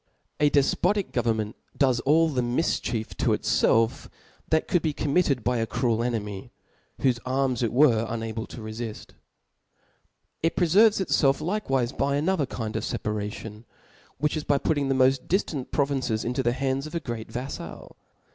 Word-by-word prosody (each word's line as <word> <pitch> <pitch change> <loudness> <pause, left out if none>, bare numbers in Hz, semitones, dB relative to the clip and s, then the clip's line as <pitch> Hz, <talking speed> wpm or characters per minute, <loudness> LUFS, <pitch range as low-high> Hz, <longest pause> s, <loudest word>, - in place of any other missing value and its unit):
A 150 - +4
defpotic 175 +8 +1
government 110 -3 -1 0.2
does 130 -4 +3
all 155 +6 +4
the 130 -4 0
mifchief 120 -3 -1
to - - +1
itfclf 115 0 +2 0.4
that 160 0 +2
could 175 - +2
be 155 -2 -1
committed 145 -4 +1
by 125 +2 +1
a 115 0 -1
cruel 115 -2 0
enemy, 105 -5 -3 0.5
whofe 125 -3 +2
arms 130 -1 0
it, 115 -3 0
were 120 -3 +4
unable 110 -1 -4
to 115 - -9
refill. 110 0 -5 1.5
it 165 - +1
preferyes 200 +5 +5
itfelf 140 -7 +2
likewife 155 - -1
by 140 0 +2
another 155 -1 +1
kind 110 -4 -5
of - - -2
reparation, 105 +1 -4 0.5
which 150 +3 0
is 155 - -2
by 145 - +2
putting 145 -1 0
the 135 - +2
moft 130 0 +3
diftant 160 -8 -1
provinces 135 -6 0
into 125 +3 -1
the 120 -1 +1
hands 135 +2 -1
of 155 - -9
a - - +1
great 115 -6 -6
vaffal. 130 +3 -7
130 Hz, 155 wpm, -26 LUFS, 115-150 Hz, 1.5 s, preferyes